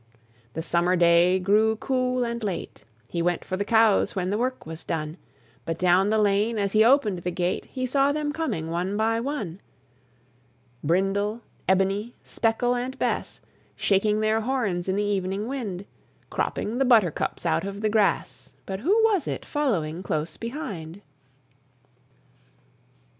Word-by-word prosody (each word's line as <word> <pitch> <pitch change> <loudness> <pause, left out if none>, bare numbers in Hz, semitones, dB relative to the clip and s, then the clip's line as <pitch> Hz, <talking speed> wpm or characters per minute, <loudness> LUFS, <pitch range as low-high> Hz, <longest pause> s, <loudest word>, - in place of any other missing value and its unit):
The 160 - -4
summer 175 +2 +2
day 175 +1 +5
grew 210 +4 +3
cool 255 +1 0
and 235 -1 -3
late: 180 - -5 0.2
He 170 - -3
went 175 0 0
for 185 - -3
the 200 - -1
cows 220 -1 +3
when 185 -1 -1
the 205 - 0
work 255 +1 -2
was 160 +1 -7
done; 155 -2 -3 0.5
But 165 0 -3
down 180 +3 +3
the 220 - +2
lane, 210 +2 +2
as 200 -2 0
he 215 +1 +5
opened 230 -7 +3
the 175 - -3
gate, 180 +1 -2
He 255 -1 -4
saw 275 +2 +2
them 295 0 -1
coming 230 - -3
one 180 +4 -1
by 225 +1 +1
one: 230 - -4 1.2
Brindle, 195 +7 0 0.3
Ebony, 195 +5 +1
Speckle, 235 +2 0
and 255 +2 -4
Bess, - - -2 0.3
Shaking 210 +2 +2
their 215 +1 +2
horns 215 -8 -1
in 190 - +1
the 205 - +1
evening 200 +1 -1
wind; 210 -8 -4 0.5
Cropping 230 +4 -2
the 270 - +3
buttercups 215 - +2
out 165 0 +1
of 200 +1 -5
the 215 - +1
grass, 210 -2 0
But 190 -1 -4
who 400 - +3
was 410 -8 +2
it - - -4
following 180 - -1
close 155 -3 -3
behind? 205 - -6
205 Hz, 155 wpm, -25 LUFS, 180-235 Hz, 1.2 s, day